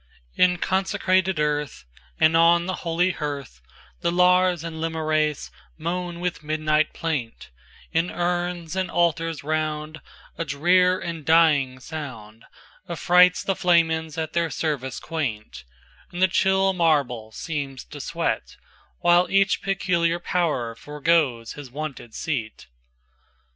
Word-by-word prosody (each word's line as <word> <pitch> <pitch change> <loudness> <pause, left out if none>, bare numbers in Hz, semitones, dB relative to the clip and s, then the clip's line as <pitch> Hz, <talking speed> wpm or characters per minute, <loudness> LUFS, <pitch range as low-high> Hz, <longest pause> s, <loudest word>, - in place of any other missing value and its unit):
XXIIn 180 -1 +3
consecrated 190 -1 +1
earth, 150 - -2 0.3
And 155 +1 +4
on 170 +1 +5
the 185 0 -3
holy 175 +2 +1
hearth, 140 - -6 0.4
The 170 - 0
Lars 180 -1 +3
and 160 -1 -6
Lemures 155 -2 -1 0.3
moan 175 +1 -3
with 180 -2 -3
midnight 155 0 +1
plaint; 135 - -4 0.4
In 165 +2 +1
urns, 175 -1 -2
and 185 -2 -1
altars 165 -2 0
round,A 155 +1 -4
drear 180 +5 +3
and 165 -2 -5
dying 150 -5 +4
soundAffrights 150 +7 -1
the 195 - 0
Flamens 160 -3 +2
at 160 -1 -3
their 170 -1 +1
service 145 -6 -3
quaint; 125 - -5 0.5
And 175 - -7
the 185 - +5
chill 190 +1 +2
marble 140 -10 +1
seems 140 0 -5
to 145 -1 -9
sweat, - - -3 0.4
While 175 +1 +4
each 195 -1 +2
peculiar 175 -3 0
power 165 -10 -1
forgoes 145 -3 0
his 145 -3 -10
wonted 135 -4 -7
seat. 115 - -4
160 Hz, 115 wpm, -24 LUFS, 150-175 Hz, 0.5 s, on